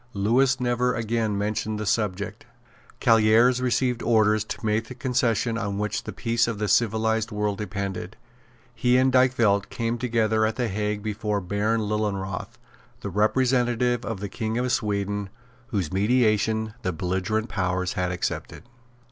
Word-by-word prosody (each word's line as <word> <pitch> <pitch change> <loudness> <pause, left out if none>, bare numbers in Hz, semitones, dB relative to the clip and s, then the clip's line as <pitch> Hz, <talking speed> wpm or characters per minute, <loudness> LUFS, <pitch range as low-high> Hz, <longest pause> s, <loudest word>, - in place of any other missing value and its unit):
Lewis 120 +7 +2
never 125 0 +1
again 115 -2 -1
mentioned 105 +1 -2
the 105 - -3
subject. 100 -1 -2 0.5
Callieres 115 +2 +4
received 125 -1 0
orders 110 -2 +3
to 110 - -7
make 110 +1 0
the 125 - -9
concession 120 -3 0
on 100 -3 -3
which 105 +1 -2
the - - -4
peace 115 0 0
of 115 -2 -3
the 105 0 -1
civilised 110 0 +1
world 105 -1 -1
depended. 100 -1 -4 0.6
He 125 +1 +2
and 130 0 +3
Dykvelt 120 -6 +3
came 115 0 -2
together 110 -3 +1
at 110 0 +1
the 120 -3 -1
Hague 105 +1 -2
before 105 -1 -2
Baron 105 +4 0
Lilienroth, 100 -3 -3 0.4
the 100 - -5
representative 120 +3 +1
of 100 -2 -4
the 100 - -3
King 110 +3 -3
of 125 0 0
Sweden, 100 -3 -1 0.4
whose 95 -10 -2
mediation 110 0 +2
the 95 - -1
belligerent 95 +6 -1
powers 90 -2 -1
had 90 -1 -1
accepted. 90 - -4
110 Hz, 150 wpm, -25 LUFS, 100-120 Hz, 0.6 s, Callieres